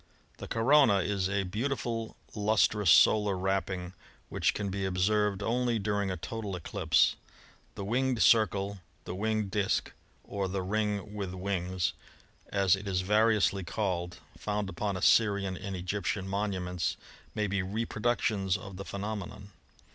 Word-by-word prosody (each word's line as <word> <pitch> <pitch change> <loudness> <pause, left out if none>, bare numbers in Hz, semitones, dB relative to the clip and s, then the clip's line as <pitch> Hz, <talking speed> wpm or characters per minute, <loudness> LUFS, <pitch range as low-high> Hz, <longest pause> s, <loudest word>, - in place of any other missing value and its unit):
— - - -34
The - - -7
corona 115 -3 +4
is 95 0 -1
a 100 0 0
beautiful 115 +2 -3 0.2
lustrous 105 -2 +2
solar 105 +3 +5
wrapping, 95 -1 -2 0.4
which - - +1
can 100 -2 -2
be 95 +1 -3
observed 100 +2 +1
only 120 +1 +1
during 100 -1 -1
a 95 - -3
total 105 +3 -5
eclipse. 85 - +2 0.6
The 100 - -5
winged 125 +3 0
circle, 100 -3 +3 0.2
the - - -6
winged 105 +1 -1
disk, 100 0 0 0.3
or 100 -1 -3
the 95 0 -2
ring 105 +1 -1
with 95 -3 -4
wings, 90 -2 -1 0.6
as 100 -2 +3
it 100 +1 -8
is 95 -2 0
variously 105 -1 +3
called, 90 -2 -2 0.2
found 105 -1 -2
upon 95 +1 -2
Assyrian 100 -1 +3
and 95 +1 -5
Egyptian 95 +1 -2
monuments, 95 -3 -2 0.4
may 105 - 0
be 100 -1 0
reproductions 105 -1 0
of 100 -3 -9
the 100 - -6
phe - - -6
nomenon. 100 -1 -5
100 Hz, 140 wpm, -30 LUFS, 95-105 Hz, 0.6 s, solar